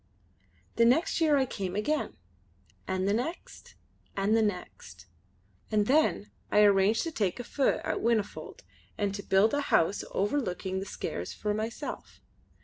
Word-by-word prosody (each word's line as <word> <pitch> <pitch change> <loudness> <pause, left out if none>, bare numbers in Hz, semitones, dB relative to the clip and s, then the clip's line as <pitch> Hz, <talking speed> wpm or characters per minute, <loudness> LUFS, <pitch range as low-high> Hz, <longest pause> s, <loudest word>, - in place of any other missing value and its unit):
The 230 - +5
next 300 +8 +2
year 305 -3 +4
I 265 - +3
came 195 -6 -4
again, 295 +9 -1 0.7
and 185 0 -1
the 200 - +2
next, 260 +11 -5 0.4
and 200 +3 +2
the 225 - +4
next. 180 - -4 0.6
And 210 -1 +2
then 275 -5 +2 0.2
I 210 - +5
arranged 205 +1 +4
to 330 - -3
take 200 - -1
a - - -3
feu 275 +2 +1
at - - -2
Whinnyfold 225 -3 -1 0.3
and 200 -2 -1
to 200 - -4
build 200 +3 +3
a 290 - +1
house 195 - +2
overlooking 190 -4 -1
the 195 - -6
Skares - - -5
for 210 -1 -2
myself. 220 +2 -5
210 Hz, 150 wpm, -29 LUFS, 195-245 Hz, 0.7 s, The